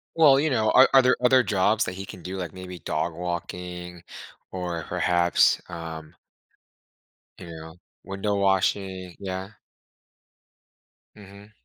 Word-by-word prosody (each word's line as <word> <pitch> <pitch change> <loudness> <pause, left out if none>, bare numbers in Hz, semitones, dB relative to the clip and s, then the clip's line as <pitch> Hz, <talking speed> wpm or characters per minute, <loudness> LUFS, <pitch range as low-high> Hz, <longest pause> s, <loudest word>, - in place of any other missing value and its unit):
Well, 150 -5 +6
you 155 +2 +1
know, 110 -5 +1
are 130 - +7
are 135 - +8
there 125 0 +3
other 130 +1 +5
jobs 105 +1 +1
that - - -4
he 95 +1 -7
can 90 - -11
do, 95 +1 -5
like, 90 -3 -5
maybe 90 -1 -9
dog - - -2
walking 90 0 -6 0.5
or 90 -3 -4
perhaps, 85 -1 +2
um 80 -2 -8 1.2
you - - -10
know, 80 -1 -10 0.3
window 95 +2 -3
washing 95 -2 0
yeah? 95 0 -5 1.7
Mhm. 100 0 -14
95 Hz, 130 wpm, -25 LUFS, 90-105 Hz, 1.7 s, are